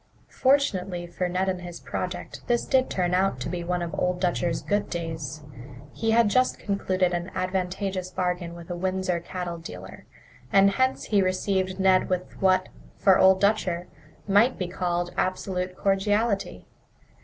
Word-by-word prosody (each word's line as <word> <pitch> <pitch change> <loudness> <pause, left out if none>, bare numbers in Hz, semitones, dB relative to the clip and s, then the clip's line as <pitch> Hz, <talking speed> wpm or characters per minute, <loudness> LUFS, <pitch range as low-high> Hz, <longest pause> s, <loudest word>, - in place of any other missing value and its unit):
Fortunately 195 -10 +1
for 175 +1 -3
Ned 185 +2 0
and 185 -1 -1
his 175 -1 -8
project, 180 -1 -5
this 240 -1 +1
did 260 -1 +2
turn 180 -1 0
out 185 -7 +2
to 125 - -4
be 175 0 -3
one 175 0 -1
of 170 - -5
Old 180 0 0
Dutcher's 175 -2 0
good 205 0 0
days. 160 -4 -5 0.5
He 225 - -2
had 230 0 +5
just 255 +5 +2
concluded 185 -3 0
an 175 +1 -2
advantageous 185 0 -2
bargain 180 -2 -2
with 170 +1 -9
a - - -2
Windsor 185 0 -1
cattle 175 0 -5
dealer, 95 - -10 0.4
and 195 0 +6
hence 260 +5 +1
he 205 -2 +2
received 185 0 0
Ned 190 -1 +4
with 180 -1 -3
what, 185 -1 +3 0.3
for 190 -2 +5
Old 190 0 +6
Dutcher, 185 -4 +1 0.4
might 210 +6 +4
be 180 - -2
called 175 -1 -2
absolute 185 0 -2
cordiality. 200 +1 0
185 Hz, 155 wpm, -26 LUFS, 175-195 Hz, 0.5 s, and